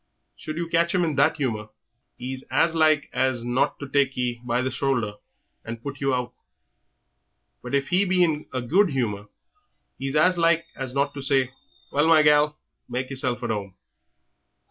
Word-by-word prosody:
Should 155 0 -7
you 170 0 -2
catch 170 +1 +2
him 180 - +3
in 160 -3 0
that 145 +3 +3
humour 110 -7 -2 0.5
'e's 130 +1 -5
as 165 - +2
like 155 -2 +3
as 130 -3 0
not 130 +4 +1
to 140 - -6
take 135 -1 +1
ye 120 -1 -2
by 125 +1 0
the 130 - -1
shoulder 120 -6 -1 0.5
and 115 +1 -6
put 140 0 -6
you 135 0 +1
out; 125 -1 -2 1.3
but - - -3
if 140 0 0
he 185 +2 +4
be 185 -2 +3
in 155 -3 0
a 130 -2 -3
good 185 - +3
humour 105 -7 -2 0.7
'e's 135 +1 -3
as 175 +3 +4
like 165 0 +3
as 130 -1 -5
not 140 +1 +1
to 140 - -6
say, 135 -2 +1 0.4
'Well, 145 +3 +2
my 160 -2 +6
gal, 150 0 +4 0.3
make 130 +2 -3
yerself 130 -2 -2
at - - -1
'ome.'" 100 -3 -4
140 Hz, 180 wpm, -24 LUFS, 125-155 Hz, 1.3 s, my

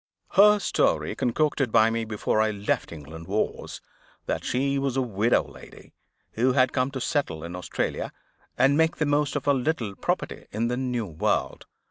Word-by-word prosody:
Her 210 +1 +6
story 205 - +1
(concocted 135 0 0
by 110 +1 +5
me 115 0 -1
before 110 0 0
I 110 - +2
left 105 -1 -2
England) 80 +1 -10
was, 105 +3 -2 0.4
that - - -2
she 140 +2 0
was 135 -1 -1
a - - +3
widow 115 0 +2
lady, - - -14 0.4
who 125 +3 +1
had 130 -1 +3
come 130 0 +1
to 135 - -3
settle 130 - -1
in 85 +1 -6
Australia, 90 - -3 0.5
and 135 +3 +4
make 160 +1 +3
the 150 - 0
most 145 -1 +1
of 145 - -2
her 145 - +4
little 125 -6 -1
property - - -3
in 115 +3 -1
the 125 - -1
New 125 -3 -2
World. 80 -5 -2
125 Hz, 175 wpm, -26 LUFS, 110-140 Hz, 0.5 s, Her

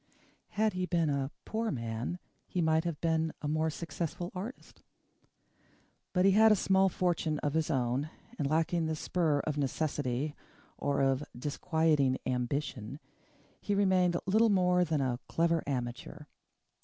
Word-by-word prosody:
Had 215 0 +3
he 185 0 -2
been 165 -4 +1
a 135 -1 -1 0.2
poor 225 +1 -1
man 115 +5 -3 0.3
he 180 - -3
might 160 0 +2
have 170 -4 -3
been 160 -1 +1
a - - -1
more 155 +1 +1
successful 170 +2 -4
artist. 205 +8 -8 1.3
But 180 0 +2
he 195 - +6
had 220 +3 +6
a - - +6
small 190 0 +3
fortune 170 -4 0
of 145 - 0
his 160 0 0
own 130 +1 0 0.3
and, 140 - 0
lacking 165 +1 +1
the 160 - -1
spur 155 -2 0
of 150 -1 -3
necessity, 145 -1 -1 0.4
or 140 -1 0
of 135 +1 +2
disquieting 150 0 +1
ambition, 125 0 -2 0.6
he 205 - -1
remained 185 -3 +3
little 220 +4 +4
more 180 -2 +3
than 155 -4 0
a 125 -2 -1
clever 165 -1 +2
amateur. 125 +3 -4
160 Hz, 145 wpm, -31 LUFS, 140-180 Hz, 1.3 s, he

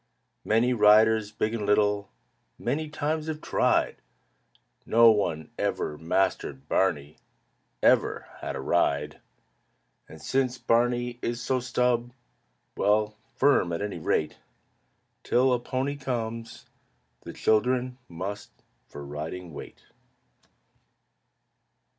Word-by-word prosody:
Many 115 +3 +2
riders, 110 -1 +5
big 110 0 -2
and 115 -2 -3
little, 105 -2 +2 0.5
Many 150 +5 -2
times 155 +1 -2
have 155 -1 -3
tried; - - +1 0.9
No 115 0 +6
one 80 -7 -1
ever 75 - -1
mastered 80 -4 -1
Barney, 75 -6 0 0.7
Ever - - +3
had - - -5
a - - -4
ride. 70 +2 0 0.9
And 80 - -12
since 130 - 0
Barney 120 +1 +1
is 120 0 -2
so 130 +2 0
stub 125 -1 0 0.6
well, 105 +1 +1 0.2
Firm, 135 -10 +3
at 85 +4 -2
any 105 -4 -4
rate, 80 -1 -1 0.8
Till 130 +1 +2
a 125 - +1
pony 130 +3 -3
comes, 115 -3 -5 0.6
the - - -8
children 125 +3 +1
Must 100 +5 -6 0.4
for 70 0 -9
riding 80 +4 -6
wait. - - -10
110 Hz, 105 wpm, -27 LUFS, 95-125 Hz, 0.9 s, No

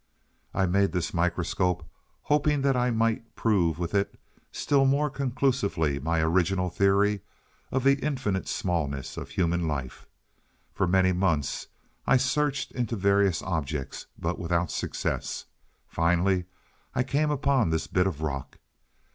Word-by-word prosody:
"I 95 - +1
made 95 0 +2
this 90 -2 -1
microscope 90 0 0 0.4
hoping 150 -1 +2
that 135 -1 +3
I 125 0 +2
might 115 0 0
prove 90 -8 +2
with 85 +1 -3
it 100 0 0 0.3
still 140 -1 +2
more 140 +2 +2
conclusively 125 - 0
my 80 +3 0
original 90 +2 +1
theory 100 +2 +3 0.5
of 130 -1 0
the 140 +1 +3
infinite 125 -10 -1
smallness 75 -7 -2
of - - -6
human 85 -1 0
life. 70 -4 -4 0.7
For 100 - +1
many 95 +1 +4
months 85 -6 0 0.4
I 135 - +6
searched 135 +1 0
into 120 -2 -2
various 100 -3 +2
objects, 75 -5 -3
but 85 +2 -2
without 85 -1 0
success. - - -3 0.4
Finally 90 +2 +1 0.5
I 125 - +2
came 145 +4 +1
upon 140 - +2
this 80 0 0
bit 90 0 +1
of 80 -5 -4
rock." 70 -4 -4
95 Hz, 135 wpm, -27 LUFS, 85-125 Hz, 0.7 s, I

